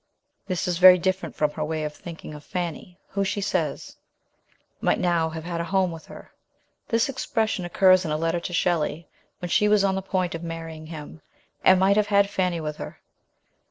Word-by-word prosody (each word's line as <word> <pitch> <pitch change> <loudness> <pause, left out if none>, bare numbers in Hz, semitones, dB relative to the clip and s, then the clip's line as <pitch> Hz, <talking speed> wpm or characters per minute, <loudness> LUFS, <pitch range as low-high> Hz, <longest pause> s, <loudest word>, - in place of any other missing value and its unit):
This 185 -1 -2
is 175 -1 -1
very 185 0 +9
different 185 +2 -2
from 150 -1 +1
her 155 - -4
way 155 0 -2
of 150 0 -4
thinking 160 -1 -9
of 150 0 -10
Fanny, 180 0 -5
who, 200 0 -1
she 195 +1 -2
says, 185 -7 -2 0.8
might - - +2
now 170 -3 +1
have 160 0 -7
had 170 0 -3
a - - -3
home 190 0 +1
with 165 -1 -10
her. - - -12 0.6
This 230 0 +2
expression 220 -7 -1
occurs 185 +1 +4
in 165 - -3
a 150 - 0
letter 165 +2 0
to 175 - -6
Shelley 170 -2 0 0.3
when 175 - -6
she 210 - +3
was 210 -1 +4
on 195 -1 +2
the 190 - -2
point 185 -2 -1
of 165 - -5
marrying 165 -2 -7
him, 155 -1 -9 0.4
and 185 0 +6
might 195 +2 +4
have 210 -1 +3
had 200 -1 +3
Fanny 180 -3 0
with 150 -1 -4
her. - - -8
175 Hz, 200 wpm, -25 LUFS, 160-190 Hz, 0.8 s, very